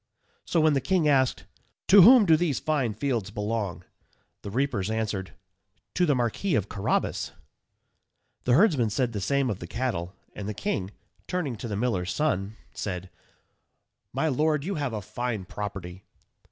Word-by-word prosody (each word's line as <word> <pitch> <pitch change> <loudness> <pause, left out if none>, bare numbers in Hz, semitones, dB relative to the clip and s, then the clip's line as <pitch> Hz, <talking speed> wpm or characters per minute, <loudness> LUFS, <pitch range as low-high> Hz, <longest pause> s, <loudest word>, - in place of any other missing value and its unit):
So 170 - +1
when 155 -1 +4
the 135 - +1
king 180 +1 +2
asked, 135 -3 +2 0.4
"To 200 +1 +9
whom 240 +3 +8
do 165 -3 +6
these 155 -4 0
fine 135 -9 0
fields 115 -5 -1
belong?" 105 -2 -3 0.6
the - - -6
reapers 120 -4 -1
answered, 105 -6 -3 0.6
"To 180 -1 +2
the 145 - +3
Marquis 125 - 0
of 105 -2 0
Carrabas." 95 - -1 1.1
The 120 - +3
herdsmen 145 - +4
said 120 +2 0
the 100 - -3
same 140 +1 +1
of 100 - -5
the 85 - -7
cattle, 95 -6 -3 0.2
and 100 0 -5
the 105 - -4
king, 95 -1 -2 0.4
turning 165 -9 -2
to 120 - -6
the 105 -3 -3
miller's 95 -6 -1
son, 110 -9 -1 0.2
said, 90 -2 -5 1.0
"My 160 - 0
lord, 150 +1 +1
you 195 +5 -2
have 145 -8 -2
a 105 -2 -4
fine 115 -2 -3
property." 95 -2 -6
120 Hz, 160 wpm, -27 LUFS, 100-150 Hz, 1.1 s, To